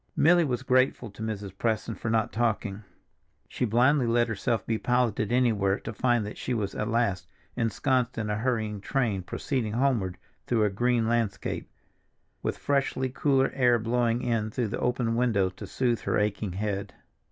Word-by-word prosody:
Milly 175 +2 +5
was 130 -4 -2
grateful 130 -3 +2
to 105 - -12
Mrs. 105 -3 -4
Preston 110 +2 -1
for 110 - -4
not 110 -1 +1
talking. 105 -3 -1 0.6
She - - -2
blindly 125 +4 +3
let 120 +1 +3
herself 110 0 -1
be 115 -1 -1
piloted 120 -3 +1
anywhere 110 -6 +2
to 115 - -6
find 120 -1 +1
that 105 - -7
she 125 - -2
was 105 -3 -2
at 105 - -2
last 110 -6 0 0.3
ensconced 125 +2 0
in 110 -2 -2
a 105 0 -1
hurrying 110 -4 -1
train 115 -6 0
proceeding 115 - -3
homeward 115 -8 +1 0.3
through 115 -3 +2
a 105 - +2
green 120 +2 +1
landscape, 115 -3 -1 0.7
with - - -2
freshly 135 -2 0
cooler 135 0 +2
air 125 -3 +4
blowing 120 +1 0
in 115 -3 0
through 115 0 -2
the - - -3
open 120 -2 0
window 110 -6 +2
to 95 - -9
soothe 120 -3 0
her - - 0
aching 105 -2 -1
head. 100 0 -3
115 Hz, 170 wpm, -27 LUFS, 105-125 Hz, 0.7 s, Milly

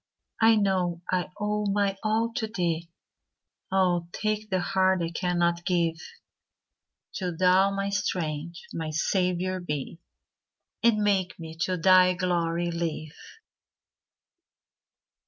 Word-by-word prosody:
I 225 0 +6
know 185 -4 0
I 180 0 0
owe 210 0 -1
my 200 -1 +1
all 225 +2 0
to 220 - -1
thee; 170 -5 -2 0.8
Oh, 180 -3 +2
take 215 +1 -2
the 190 -1 +1
heart 185 0 +2
I 165 - -3
cannot 175 -1 0
give! 170 -3 +1 1.2
Do 180 -3 -3
Thou 185 +2 +4
my 195 0 -2
strength—my 165 -4 -3
Saviour 180 +3 0
be, 150 -2 -5 0.8
And 220 -3 +3
make 195 -3 +1
me 160 -1 -8
to 185 -1 -1
thy 185 +1 +5
glory 175 -1 0
live. 165 -2 -3
180 Hz, 110 wpm, -27 LUFS, 170-195 Hz, 1.2 s, I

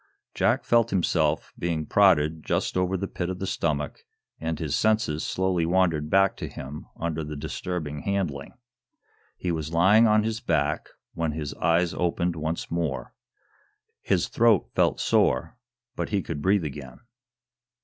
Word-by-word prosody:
Jack - - +2
felt 115 -1 +3
himself 80 -5 0
being 80 -3 -1
prodded 80 -4 +3
just - - -1
over 90 +1 +1
the 100 +2 -3
pit 90 -1 -4
of 95 - -3
the 95 - -4
stomach, 75 -5 -2 0.4
and 80 -1 -2
his 75 -4 -2
senses 110 -8 +1
slowly 95 -2 0
wandered 85 -3 +1
back 95 +2 +4
to - - -5
him 70 +3 -8
under 80 -1 -2
the 75 0 -6
disturbing 75 0 -4
handling. 85 -7 -3 0.8
He 90 - -2
was 80 -1 -3
lying 100 +7 +6
on 105 0 +4
his 110 0 -2
back, 75 -8 0 0.2
when 80 -2 -1
his 75 -2 -4
eyes 85 +1 +1
opened 85 0 0
once 80 +1 -3
more. 80 -5 -2 0.9
His - - +1
throat 115 -4 +3
felt - - +2
sore, 65 - +2 0.4
but - - -3
he 100 -3 0
could 75 -3 -5
breathe 95 0 +2
again. 65 -3 -8
85 Hz, 150 wpm, -26 LUFS, 75-95 Hz, 0.9 s, lying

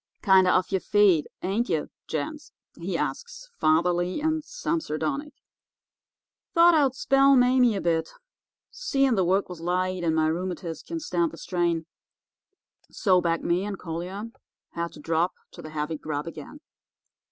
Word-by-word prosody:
"'Kinder 190 -3 +5
off 185 +2 +2
yer 190 - +2
feed, 195 -6 +3 0.2
ain't 205 +6 -1
ye, 160 -3 +1 0.2
gents?' 290 - -4 0.3
he - - -2
asks, - - -5
fatherly 175 - +2
and 315 0 0
some 335 -7 -2
sardonic. 285 - -3 1.2
'Thought 340 +1 +7
I'd 280 -5 +3
spell 275 +1 +4
Mame 250 -2 +4
a - - -3
bit, 165 -1 0 0.6
seein' 275 - +1
the 190 -4 +2
work 190 +3 +1
was 180 -3 -9
light, 180 +1 -1
and 160 -2 +1
my 160 0 +2
rheumatiz 175 0 -3
can 335 0 -5
stand 175 - -1
the 165 - -11
strain.' 170 -2 -1 1.0
"So 185 -5 +2
back 170 -1 0
me 175 +2 +1
and 205 -1 -4
Collier 185 +6 -6 0.4
had 170 0 -4
to - - -12
drop 165 +3 0 0.2
to - - -11
the 155 - -9
heavy 155 0 -3
grub 145 -1 -4
again. 165 - -9
185 Hz, 150 wpm, -26 LUFS, 165-260 Hz, 1.2 s, Thought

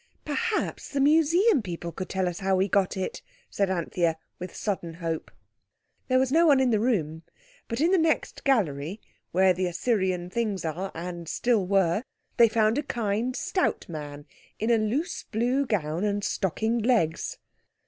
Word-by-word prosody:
"Perhaps 430 +9 -2
the 280 - -2
Museum 325 - +4
people 170 -3 -5
could 185 +2 -6
tell 190 -1 0
us 175 -1 -3
how 195 0 +1
we 190 +1 +2
got 195 0 +1
it," 190 - -3 0.3
said 200 -1 0
Anthea 170 -2 0 0.2
with 180 0 -7
sudden 175 -5 -3
hope. 165 -2 -4 0.8
There 255 -1 +3
was 260 0 +2
no 330 +3 +5
one 280 -3 +6
in 260 -2 +3
the 215 - +3
room, 165 -10 0 0.5
but 230 0 -3
in 330 +4 +3
the 380 - +4
next 320 0 0
gallery, 185 - 0 0.3
where 185 +1 +4
the 180 +1 -1
Assyrian 185 -2 0
things 210 -5 -1
are 180 +5 -3
and 170 -1 -6
still 220 -1 +1
were, 195 -1 +2 0.4
they 235 -2 +7
found 220 +3 +2
a - - +1
kind, 235 -2 -2
stout 370 - -1
man 145 -3 -7 0.3
in 220 +2 0
a 230 - +4
loose, 245 - -1
blue 250 +5 +1
gown, 170 -5 -1
and 205 -1 0
stockinged 220 +6 0
legs. 215 -10 +1
205 Hz, 170 wpm, -27 LUFS, 175-250 Hz, 0.8 s, they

